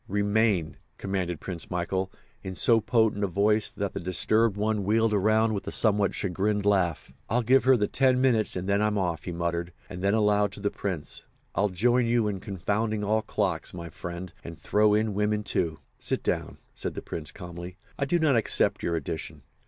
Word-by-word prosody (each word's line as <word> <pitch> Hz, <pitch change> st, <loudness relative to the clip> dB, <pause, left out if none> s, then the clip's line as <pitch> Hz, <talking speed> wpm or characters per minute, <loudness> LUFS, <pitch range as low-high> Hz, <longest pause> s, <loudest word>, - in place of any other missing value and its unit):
"Remain!" 100 Hz, -4 st, +1 dB, 0.2 s
commanded 90 Hz, -4 st, -2 dB
Prince 85 Hz, -1 st, -7 dB
Michael, 95 Hz, +2 st, -2 dB, 0.3 s
in 95 Hz, -1 st, -6 dB
so 115 Hz, +6 st, +4 dB
potent 110 Hz, -2 st, +2 dB
a -, -, +2 dB
voice 105 Hz, +3 st, +2 dB
that 100 Hz, -1 st, -4 dB
the -, -, -3 dB
disturbed 105 Hz, +4 st, +2 dB
one 105 Hz, 0 st, 0 dB
wheeled 110 Hz, +2 st, +2 dB
around 110 Hz, +2 st, +3 dB
with 100 Hz, -, -4 dB
a -, -, -2 dB
somewhat 105 Hz, -3 st, +2 dB
chagrined 100 Hz, +2 st, -1 dB
laugh. 95 Hz, -6 st, +1 dB, 0.2 s
"I'll 120 Hz, +3 st, +1 dB
give 130 Hz, +3 st, +4 dB
her 130 Hz, -1 st, +6 dB
the 105 Hz, -2 st, +1 dB
ten 130 Hz, -1 st, +2 dB
minutes 120 Hz, -5 st, +2 dB
and 90 Hz, +1 st, -4 dB
then 100 Hz, +1 st, +2 dB
I'm 105 Hz, 0 st, +1 dB
off," 85 Hz, -5 st, -2 dB
he 90 Hz, -, -3 dB
muttered, 85 Hz, 0 st, -2 dB, 0.2 s
and 90 Hz, -, -6 dB
then 100 Hz, +2 st, +2 dB
aloud 105 Hz, -1 st, +2 dB
to -, -, -8 dB
the 100 Hz, 0 st, -1 dB
Prince: 90 Hz, -7 st, -5 dB, 0.3 s
"I'll 100 Hz, +3 st, +1 dB
join 120 Hz, +6 st, +2 dB
you 115 Hz, -2 st, +2 dB
in 100 Hz, -2 st, -2 dB
confounding 105 Hz, +3 st, -2 dB
all 110 Hz, +2 st, +1 dB
clocks, 105 Hz, -, -2 dB
my 85 Hz, -1 st, -7 dB
friend, 85 Hz, +2 st, -7 dB
and 85 Hz, -1 st, -8 dB
throw 105 Hz, +2 st, +3 dB
in 110 Hz, 0 st, +1 dB
women, 105 Hz, +1 st, 0 dB
too." 80 Hz, -5 st, -1 dB, 0.2 s
"Sit -, -, -2 dB
down," -, -, -2 dB, 0.2 s
said -, -, -3 dB
the -, -, -6 dB
Prince 80 Hz, -1 st, -6 dB
calmly. 90 Hz, 0 st, -9 dB, 0.2 s
"I 140 Hz, -, +1 dB
do 175 Hz, +6 st, +2 dB
not 155 Hz, -5 st, +3 dB
accept 115 Hz, -, +2 dB
your 85 Hz, -, -1 dB
addition. 80 Hz, 0 st, -5 dB
100 Hz, 195 wpm, -27 LUFS, 90-110 Hz, 0.3 s, her